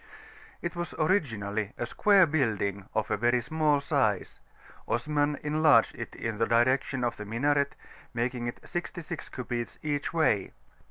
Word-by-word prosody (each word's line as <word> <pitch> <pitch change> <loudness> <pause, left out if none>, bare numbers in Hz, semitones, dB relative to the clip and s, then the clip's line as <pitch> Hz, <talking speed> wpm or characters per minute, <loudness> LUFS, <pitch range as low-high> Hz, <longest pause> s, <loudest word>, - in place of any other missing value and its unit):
It 170 +1 -3
was 175 -1 -4
originally 110 - 0
a 120 - -2
square 195 - +5
building 105 - -1
of 110 - 0
very 120 +3 +2
small 150 +1 +1
size; 130 - 0 0.5
Osman 145 +4 0
enlarged 155 0 +4
it - - -7
in 110 -2 -4
the 115 - +2
direction 130 +3 +2
of 120 - -1
the 105 - -6
minaret, 140 +6 +1 0.4
making 120 0 -2
it 120 - -7
sixty 175 0 -4
six 155 - -7
cubits 120 -2 -4
each 145 -2 -1
way. 135 - +1
130 Hz, 145 wpm, -29 LUFS, 115-150 Hz, 0.5 s, square